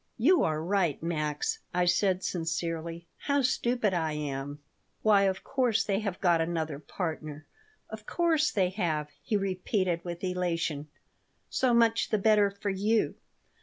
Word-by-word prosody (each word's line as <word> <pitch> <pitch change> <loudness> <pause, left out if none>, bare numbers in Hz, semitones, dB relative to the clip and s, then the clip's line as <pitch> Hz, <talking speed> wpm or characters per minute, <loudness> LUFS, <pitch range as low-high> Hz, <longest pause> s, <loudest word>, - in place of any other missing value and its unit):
"You 330 +10 +4
are 155 0 0
right, 175 -4 +1
Max," 150 -3 -1 0.2
I 180 0 +3
said, 185 +1 +2
sincerely. 165 0 -3 0.2
"How 280 -1 +2
stupid 240 -4 +1
I 160 -3 0
am." 145 -1 -4 0.5
"Why, 205 -2 +5
of 190 0 -2
course 255 -5 +1
they 200 -1 0
have 200 -4 -3
got 175 -3 +3
another 160 -3 -2
partner. 155 -2 -5 0.4
Of 220 0 -9
course 325 -3 +2
they 185 -3 +2
have," 160 -6 -1
he 210 - 0
repeated, 185 -2 -1
with 175 0 -6
elation. 170 -5 -1 0.6
"So 250 -2 +2
much 230 -1 +3
the 215 - +2
better 210 0 +4
for 200 0 -4
you. 210 +4 +1
185 Hz, 145 wpm, -29 LUFS, 165-215 Hz, 0.6 s, Why